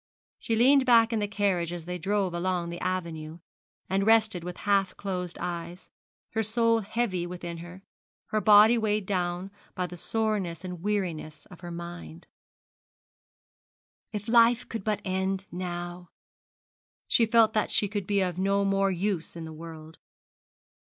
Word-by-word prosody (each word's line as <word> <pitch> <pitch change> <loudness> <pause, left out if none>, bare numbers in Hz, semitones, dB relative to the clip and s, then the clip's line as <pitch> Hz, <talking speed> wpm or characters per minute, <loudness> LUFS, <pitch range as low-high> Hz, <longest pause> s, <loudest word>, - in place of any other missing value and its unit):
She 225 - -1
leaned 260 +3 +5
back 230 -1 +5
in 225 - +1
the 205 - 0
carriage 195 -5 0
as 175 -2 -6
they 180 0 -4
drove 195 0 0
along 175 -1 -1
the 175 - -6
avenue, 165 -4 -3 0.5
and 195 +1 +1
rested 220 -4 +3
with 180 0 -6
half 195 -2 +2
closed 180 -3 -4
eyes, 170 +1 -6 0.4
her 220 - 0
soul 230 +1 +2
heavy 205 -4 -2
within 175 -1 -6
her, 175 +3 -11 0.5
her 215 - 0
body 215 +3 +7
weighed 215 -2 0
down 180 0 -2 0.2
by 180 - -1
the 180 0 -8
soreness 200 -3 -1
and 180 -2 -6
weariness 170 -7 -3
of 180 - -12
her 175 0 -8
mind. 170 -1 -8 1.9
If 210 0 -5
life 235 +1 +4
could 225 -4 -5
but 210 -1 -1
end 190 0 -1
now! 175 0 -5 1.0
She 230 - +3
felt 225 -1 +5
that 215 - +1
she 205 - +2
could 200 -2 -4
be 200 -1 +2
of 180 -1 -2
no 200 +1 +2
more 195 0 +2
use 185 -3 -2
in 165 - -6
the 160 0 -8
world. 160 0 -10
190 Hz, 155 wpm, -28 LUFS, 175-210 Hz, 1.9 s, body